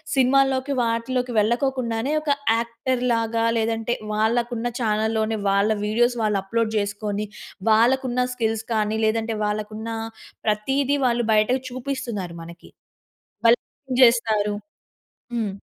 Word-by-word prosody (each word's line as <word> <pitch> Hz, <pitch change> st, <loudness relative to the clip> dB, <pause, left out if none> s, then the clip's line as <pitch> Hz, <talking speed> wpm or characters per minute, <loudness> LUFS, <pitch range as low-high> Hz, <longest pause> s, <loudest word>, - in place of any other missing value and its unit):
సినిమా‌ల్లోకి 270 Hz, +1 st, +3 dB
వాటిలోకి 240 Hz, +2 st, -1 dB
వెళ్ళకొకుండానే 240 Hz, +2 st, 0 dB
ఒక 305 Hz, -, -4 dB, 0.3 s
యాక్టర్‌లాగా 230 Hz, -1 st, 0 dB
లేదంటే 225 Hz, +1 st, 0 dB, 0.2 s
వాళ్ళకు 235 Hz, +3 st, +1 dB
ఉన్న 240 Hz, +2 st, -2 dB
చానెల్‌లోనే 220 Hz, 0 st, 0 dB
వాళ్ళ 200 Hz, +2 st, +3 dB, 0.2 s
వీడియోస్ 240 Hz, +3 st, +2 dB
వాళ్ళు 210 Hz, -2 st, +1 dB
అప్‌లోడ్ 225 Hz, +2 st, -1 dB
జేసుకొని, 205 Hz, 0 st, -2 dB, 0.4 s
వాళ్ళకు 250 Hz, +5 st, +4 dB
ఉన్న 250 Hz, -, -1 dB, 0.2 s
స్కిల్స్‌ 225 Hz, -2 st, -1 dB
కానీ 215 Hz, 0 st, 0 dB
లేదంటే 225 Hz, +1 st, 0 dB
వాళ్ళకు 210 Hz, 0 st, -2 dB
ఉన్న 225 Hz, +1 st, -5 dB, 0.6 s
ప్రతీది 270 Hz, +7 st, +1 dB
వాళ్ళు 240 Hz, -1 st, +1 dB
బయటకు 215 Hz, +5 st, +3 dB
చూపిస్తున్నారు 240 Hz, -9 st, -4 dB
మనకి. 170 Hz, +1 st, -12 dB, 0.8 s
వాళ్ళేం 250 Hz, +3 st, +1 dB
జేస్తారు. 220 Hz, -4 st, +4 dB, 0.8 s
హ్మ్. 215 Hz, -4 st, -1 dB
230 Hz, 110 wpm, -23 LUFS, 215-250 Hz, 0.8 s, వాళ్ళకు